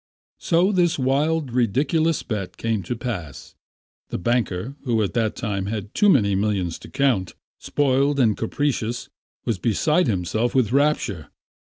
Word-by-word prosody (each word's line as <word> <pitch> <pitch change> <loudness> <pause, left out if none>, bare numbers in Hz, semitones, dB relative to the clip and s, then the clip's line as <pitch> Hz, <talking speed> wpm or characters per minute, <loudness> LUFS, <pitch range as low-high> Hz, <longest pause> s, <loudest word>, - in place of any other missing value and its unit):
So 175 +4 +2
this 175 -3 +2
wild, 145 +2 +1
ridiculous 140 +7 +1
bet 105 -5 -4
came 115 -3 -1
to 95 +7 -4
pass. 110 - -6 0.6
The - - -3
banker, 115 +2 -1
who 115 -5 +1
at 100 - -2
that 115 -3 0
time 100 -4 -3
had 105 -1 -4
too 205 - +4
many 105 - +4
millions 95 -4 -1
to - - -12
count, 130 -10 0 0.2
spoiled 140 0 +1
and 110 -5 +3
capricious, 120 -1 -2 0.4
was 110 -5 -1
beside 150 - +2
himself 110 +4 -1
with 120 -5 +2
rapture. 135 - +1
120 Hz, 140 wpm, -23 LUFS, 105-140 Hz, 0.6 s, too